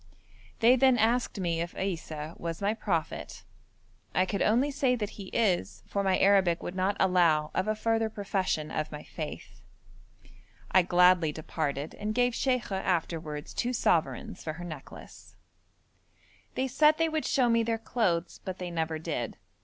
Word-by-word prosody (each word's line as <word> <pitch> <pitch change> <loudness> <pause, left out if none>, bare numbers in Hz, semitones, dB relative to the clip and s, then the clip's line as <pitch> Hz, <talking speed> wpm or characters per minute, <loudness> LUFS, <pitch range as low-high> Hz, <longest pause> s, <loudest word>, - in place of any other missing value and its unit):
They 240 +3 +7
then 260 -1 +4
asked 230 0 +1
me 170 -3 -1
if 170 +1 -5
Issa 160 -4 -4
was 165 -1 -4
my 205 +1 +1
prophet. 185 -7 -3 0.7
I 185 - +4
could 200 +1 -3
only 250 +7 +3
say 265 -2 +1
that 210 -3 -3
He 200 - -9
is, 195 -6 0
for 200 - -2
my 190 -1 +2
Arabic 190 -4 +3
would 175 - -4
not 190 +2 0
allow 170 -5 +3
of 185 - 0
a 215 - +1
further 225 0 0
profession 190 -7 -2
of 155 0 -3
my 150 -1 -7
faith. - - -8 1.1
I 185 - +6
gladly 180 -2 +4
departed 150 -1 -3
and 215 +1 -4
gave 245 0 +2
Sheikha 240 -7 0
afterwards 160 -4 -2
two 245 +1 -1
sovereigns 155 - 0
for 155 - -3
her 175 +2 -8
necklace. 155 -5 -11 1.2
They 265 - 0
said 300 +4 +4
they 330 - +2
would 315 -1 -2
show 255 -3 +3
me 230 0 +3
their 225 0 0
clothes, 190 -7 -1
but 185 -1 -5
they 180 -1 -5
never 160 -1 -1
did. 155 - -4
190 Hz, 160 wpm, -29 LUFS, 165-225 Hz, 1.2 s, They